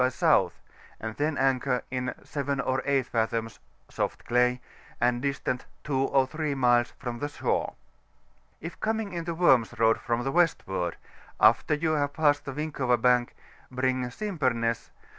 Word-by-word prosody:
by 125 Hz, -, +5 dB
S., 130 Hz, -, -7 dB, 0.8 s
and 110 Hz, 0 st, -5 dB
then 150 Hz, 0 st, 0 dB
anchor 130 Hz, -1 st, +1 dB
in 125 Hz, 0 st, -2 dB
7 140 Hz, -1 st, -3 dB
or 130 Hz, 0 st, 0 dB
8 140 Hz, -2 st, +2 dB
fathoms, 115 Hz, -1 st, -2 dB, 0.3 s
soft -, -, -3 dB
clay, 125 Hz, +1 st, +2 dB, 0.4 s
and 120 Hz, 0 st, +2 dB
dbtant 140 Hz, -2 st, -2 dB, 0.2 s
2 135 Hz, -2 st, 0 dB
or 135 Hz, -1 st, +3 dB
3 155 Hz, +1 st, -3 dB
miles 120 Hz, -2 st, +3 dB
from 120 Hz, -1 st, -5 dB
the 145 Hz, -, -2 dB
shore. 145 Hz, -, -2 dB, 0.9 s
K 165 Hz, -, -4 dB
coining 220 Hz, -3 st, -2 dB
into 170 Hz, -1 st, -3 dB
Worms 135 Hz, -10 st, +3 dB
Road 115 Hz, 0 st, +3 dB
from 120 Hz, 0 st, -1 dB
the 135 Hz, -, -1 dB
westward, 95 Hz, -, 0 dB, 0.4 s
after 150 Hz, -, +4 dB
vou 160 Hz, +1 st, 0 dB
have 145 Hz, -1 st, 0 dB
passed 145 Hz, -2 st, +2 dB
the 135 Hz, -, -4 dB
Winkova 135 Hz, -4 st, 0 dB
Bank, 125 Hz, 0 st, +2 dB, 0.3 s
bring 130 Hz, 0 st, 0 dB
Simpemess 125 Hz, -, -1 dB
W. -, -, -32 dB
130 Hz, 155 wpm, -27 LUFS, 120-145 Hz, 0.9 s, by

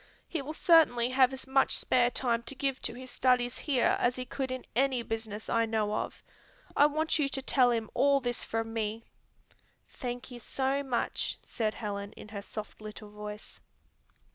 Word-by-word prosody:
He 325 Hz, -, -2 dB
will 280 Hz, +3 st, -5 dB
certainly 310 Hz, -9 st, +5 dB
have 260 Hz, 0 st, +5 dB
as 265 Hz, 0 st, -6 dB
much 265 Hz, 0 st, +3 dB
spare 245 Hz, -1 st, +3 dB
time 240 Hz, -2 st, 0 dB
to 275 Hz, -, -3 dB
give 270 Hz, -1 st, -1 dB
to -, -, -3 dB
his 255 Hz, 0 st, -8 dB
studies 250 Hz, -1 st, +2 dB
here 265 Hz, -5 st, +2 dB
as 245 Hz, 0 st, +2 dB
he 255 Hz, -, -4 dB
could 260 Hz, +1 st, -3 dB
in 255 Hz, 0 st, -4 dB
any 260 Hz, -1 st, +2 dB
business 220 Hz, -2 st, -4 dB
I 230 Hz, 0 st, +2 dB
know 215 Hz, -2 st, 0 dB
of. -, -, -3 dB, 0.5 s
I 290 Hz, -, +7 dB
want 310 Hz, +2 st, 0 dB
you 280 Hz, -2 st, +2 dB
to 270 Hz, -, +1 dB
tell 255 Hz, -2 st, +4 dB
him 225 Hz, -2 st, 0 dB
all 280 Hz, 0 st, +4 dB
this 245 Hz, -2 st, -2 dB
from 225 Hz, 0 st, -3 dB
me." 220 Hz, 0 st, -2 dB, 0.8 s
"Thank 245 Hz, -1 st, -6 dB
you 245 Hz, -, -8 dB
so 270 Hz, +4 st, -1 dB
much," 260 Hz, -4 st, -1 dB
said 215 Hz, -2 st, -2 dB
Helen 200 Hz, -1 st, -4 dB
in 210 Hz, -, -11 dB
her 205 Hz, -1 st, -5 dB
soft 215 Hz, +1 st, -8 dB
little 210 Hz, 0 st, -9 dB
voice. 210 Hz, 0 st, -9 dB
245 Hz, 185 wpm, -30 LUFS, 225-270 Hz, 0.8 s, I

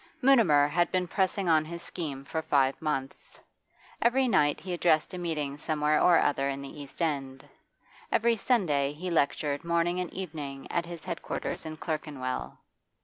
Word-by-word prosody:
Mutimer 230 Hz, -, +5 dB
had 175 Hz, +3 st, +1 dB
been 185 Hz, -1 st, 0 dB
pressing 190 Hz, +1 st, 0 dB
on 160 Hz, -2 st, +4 dB
his 170 Hz, +2 st, -8 dB
scheme 140 Hz, -7 st, -5 dB
for 160 Hz, +3 st, -2 dB
five 135 Hz, -3 st, +1 dB
months. 135 Hz, -4 st, -4 dB, 0.6 s
Every 255 Hz, +2 st, +3 dB
night 150 Hz, -10 st, +3 dB
he 185 Hz, -1 st, -5 dB
addressed 170 Hz, -1 st, +2 dB
a 180 Hz, -, -4 dB
meeting 150 Hz, -5 st, -3 dB
somewhere 150 Hz, 0 st, +1 dB
or 175 Hz, -2 st, +6 dB
other 140 Hz, -2 st, +1 dB
in 140 Hz, 0 st, -4 dB
the 145 Hz, +2 st, -9 dB
East 145 Hz, +4 st, -5 dB
End; 135 Hz, -4 st, -3 dB, 0.6 s
every 230 Hz, +1 st, +3 dB
Sunday 155 Hz, -, +1 dB
he 175 Hz, +4 st, -5 dB
lectured 145 Hz, -1 st, 0 dB
morning 170 Hz, +1 st, +1 dB
and 180 Hz, -2 st, -3 dB
evening 150 Hz, -7 st, -6 dB
at 170 Hz, -1 st, -1 dB
his 170 Hz, -2 st, -8 dB
head 170 Hz, -, -4 dB
quarters -, -, -4 dB
in 155 Hz, 0 st, -6 dB
Clerkenwell. 150 Hz, -6 st, -4 dB
160 Hz, 165 wpm, -29 LUFS, 145-175 Hz, 0.6 s, or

